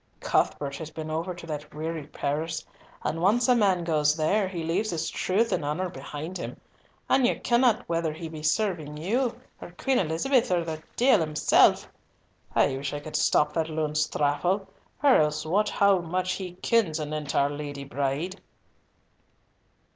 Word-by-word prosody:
Cuthbert 140 Hz, -1 st, 0 dB
has 160 Hz, -2 st, -6 dB
been 155 Hz, 0 st, -6 dB
over 170 Hz, +3 st, -2 dB
to 175 Hz, -, -10 dB
that 150 Hz, -2 st, -6 dB
weary 160 Hz, -1 st, -4 dB
Paris, 155 Hz, +3 st, -3 dB, 0.4 s
and 165 Hz, +2 st, -2 dB
once 225 Hz, +6 st, +3 dB
a 250 Hz, -, +6 dB
man 195 Hz, -6 st, +2 dB
goes 150 Hz, -3 st, +2 dB
there, 190 Hz, +6 st, +2 dB
he 175 Hz, -3 st, -5 dB
leaves 185 Hz, +7 st, 0 dB
his 165 Hz, -2 st, -2 dB
truth 215 Hz, +5 st, +1 dB
and -, -, 0 dB
honour 160 Hz, +6 st, -2 dB
behind 150 Hz, +5 st, -7 dB
him, -, -, -6 dB, 0.5 s
and 270 Hz, -, +3 dB
ye -, -, +1 dB
kenna 240 Hz, -2 st, +2 dB
whether 165 Hz, -1 st, -1 dB
he 160 Hz, +2 st, -7 dB
be 160 Hz, -1 st, -8 dB
serving 155 Hz, -3 st, 0 dB
you, 235 Hz, -, -1 dB, 0.2 s
or 175 Hz, -, -9 dB
Queen 270 Hz, -2 st, +1 dB
Elizabeth, 190 Hz, -, +1 dB
or 175 Hz, -2 st, +2 dB
the 160 Hz, -1 st, -5 dB
deil 250 Hz, -3 st, +5 dB
himsel'. 155 Hz, -2 st, +4 dB, 0.8 s
I 135 Hz, -, +3 dB
wish 140 Hz, +1 st, -4 dB
I -, -, -3 dB
could 150 Hz, +1 st, -8 dB
stop 150 Hz, -, +3 dB
that 165 Hz, -1 st, -1 dB
loon's 155 Hz, -1 st, 0 dB
thrapple, 175 Hz, +7 st, 0 dB, 0.4 s
or 280 Hz, -3 st, +7 dB
else 150 Hz, 0 st, +1 dB
wot 200 Hz, +6 st, +2 dB
how 200 Hz, -2 st, +4 dB
much 180 Hz, +2 st, -2 dB
he 185 Hz, -2 st, -5 dB
kens 200 Hz, -10 st, +2 dB
anent 150 Hz, -1 st, -4 dB
our 140 Hz, +1 st, +3 dB
Lady 145 Hz, -1 st, -6 dB
Bride." 140 Hz, +7 st, -3 dB
165 Hz, 170 wpm, -27 LUFS, 150-190 Hz, 0.8 s, or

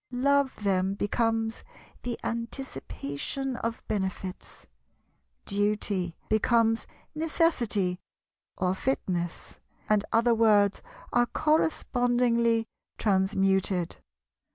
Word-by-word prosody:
"Love" 270 Hz, -1 st, +1 dB
them 190 Hz, -1 st, +1 dB
becomes 225 Hz, +2 st, 0 dB, 0.4 s
"the 240 Hz, -1 st, -4 dB
anticipation 235 Hz, -, -4 dB
of 230 Hz, -1 st, -4 dB
benefits"; 190 Hz, -2 st, -4 dB, 0.8 s
"duty" 200 Hz, -3 st, 0 dB
becomes 225 Hz, +1 st, +2 dB, 0.3 s
"necessity" 245 Hz, -, +1 dB, 0.6 s
or 180 Hz, 0 st, +1 dB
"fitness"; 180 Hz, -7 st, -2 dB, 0.3 s
and 210 Hz, -1 st, +3 dB
other 235 Hz, +1 st, +4 dB
words 210 Hz, -3 st, +4 dB, 0.3 s
are 240 Hz, 0 st, +4 dB
correspondingly 245 Hz, -7 st, +2 dB, 0.3 s
transmuted. 190 Hz, -2 st, +1 dB
225 Hz, 75 wpm, -28 LUFS, 190-245 Hz, 0.8 s, other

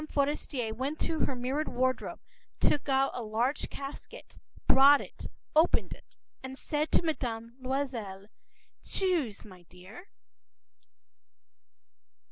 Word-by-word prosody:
Forester 280 Hz, -5 st, 0 dB
went 270 Hz, +7 st, -3 dB
to 320 Hz, -, 0 dB
her 270 Hz, -, -2 dB
mirrored 260 Hz, +5 st, -1 dB
wardrobe, 255 Hz, +1 st, -1 dB, 0.4 s
took 290 Hz, -1 st, +2 dB
out 270 Hz, 0 st, +3 dB
a 245 Hz, -, -4 dB
large 230 Hz, +6 st, -1 dB
casket, 275 Hz, 0 st, -9 dB, 0.3 s
brought 280 Hz, +2 st, +7 dB
it, -, -, -8 dB, 0.3 s
opened 320 Hz, +3 st, +4 dB
it, -, -, -18 dB, 0.2 s
and 265 Hz, 0 st, -7 dB
said 300 Hz, +2 st, -1 dB
to -, -, +4 dB
Mme. 235 Hz, -8 st, -2 dB
Loisel:— 250 Hz, -8 st, -3 dB, 0.6 s
“Choose, 330 Hz, -, 0 dB
my 185 Hz, -4 st, -13 dB
dear. 200 Hz, -, -13 dB
265 Hz, 110 wpm, -30 LUFS, 230-290 Hz, 0.6 s, brought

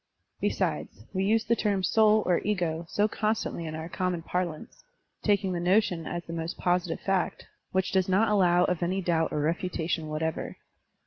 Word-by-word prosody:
Besides, 105 Hz, -, -2 dB
we 190 Hz, -, 0 dB
use 220 Hz, +2 st, +3 dB
the 235 Hz, 0 st, +2 dB
term 200 Hz, -4 st, 0 dB
"soul," 215 Hz, +1 st, +4 dB
or 175 Hz, -1 st, +3 dB
"ego," 170 Hz, -5 st, -1 dB
so 205 Hz, +1 st, +2 dB
constantly 215 Hz, -6 st, -2 dB
in 155 Hz, -, -5 dB
our 160 Hz, +1 st, -5 dB
common 180 Hz, -2 st, -2 dB
parlance, 175 Hz, -3 st, -4 dB, 0.4 s
taking 200 Hz, -3 st, +1 dB
the 175 Hz, -, -1 dB
notion 180 Hz, -2 st, +2 dB
as 175 Hz, 0 st, -4 dB
the 165 Hz, -, -8 dB
most 165 Hz, 0 st, -4 dB
positive 175 Hz, -2 st, 0 dB
fact, 195 Hz, -2 st, -1 dB, 0.3 s
which 190 Hz, 0 st, 0 dB
does 190 Hz, -1 st, +2 dB
not 200 Hz, +4 st, +4 dB
allow 180 Hz, -4 st, +4 dB
of 180 Hz, -2 st, 0 dB
any 185 Hz, +2 st, 0 dB
doubt 165 Hz, -2 st, +1 dB
or 150 Hz, -, -1 dB
refutation 165 Hz, 0 st, -1 dB
whatever. 155 Hz, +1 st, -3 dB
180 Hz, 175 wpm, -28 LUFS, 165-195 Hz, 0.4 s, soul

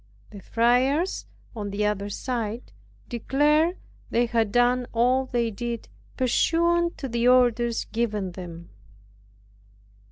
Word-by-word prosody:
The 200 Hz, -2 st, -10 dB
friars, 255 Hz, -, +1 dB, 0.3 s
on 205 Hz, -2 st, -4 dB
the 205 Hz, +1 st, -1 dB
other 205 Hz, -1 st, -1 dB
side 235 Hz, 0 st, -4 dB, 0.4 s
declared, 300 Hz, +8 st, +2 dB, 0.3 s
they 240 Hz, +1 st, +2 dB
had 230 Hz, -3 st, 0 dB
done 245 Hz, +1 st, +2 dB
all 250 Hz, +3 st, +2 dB
they 235 Hz, -2 st, 0 dB
did, 235 Hz, +2 st, -5 dB, 0.3 s
pursuant 340 Hz, +7 st, +2 dB
to 270 Hz, -, -4 dB
the 235 Hz, 0 st, 0 dB
orders 240 Hz, -2 st, +3 dB
given 210 Hz, -5 st, -2 dB
them. 170 Hz, -2 st, -9 dB
240 Hz, 115 wpm, -25 LUFS, 215-255 Hz, 0.4 s, orders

